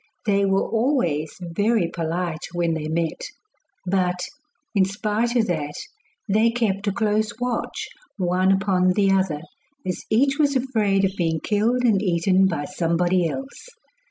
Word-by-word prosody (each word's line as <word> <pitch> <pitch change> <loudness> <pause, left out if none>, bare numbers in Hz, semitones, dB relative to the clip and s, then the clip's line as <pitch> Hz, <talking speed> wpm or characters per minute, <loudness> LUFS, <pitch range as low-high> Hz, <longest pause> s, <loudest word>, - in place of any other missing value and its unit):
They 200 -1 +2
were 195 0 +1
always 220 - 0
very 190 +3 +1
polite 165 0 -3
when 170 -1 0
they 155 -1 -3
met; 165 0 -2 0.6
but, 180 -1 0 0.5
in 200 -3 +4
spite 210 +4 -1
of 235 -2 +3
that, 150 -6 -2 0.5
they 215 +3 +3
kept 215 -4 -1
a - - +3
close 215 0 0
watch 245 -2 -2 0.3
one 185 0 +2
upon 190 -2 +2
the 195 0 +3
other, 190 -6 +1 0.4
as 185 -1 -3
each 275 +6 +2
was 285 -2 +3
afraid 215 -7 +1
of 190 0 -2
being 165 -3 0
killed 225 +7 +1
and 215 -5 +3
eaten 185 0 +3
by 165 -6 -2
somebody 175 0 +1
else. 270 - -7
195 Hz, 145 wpm, -23 LUFS, 175-220 Hz, 0.6 s, in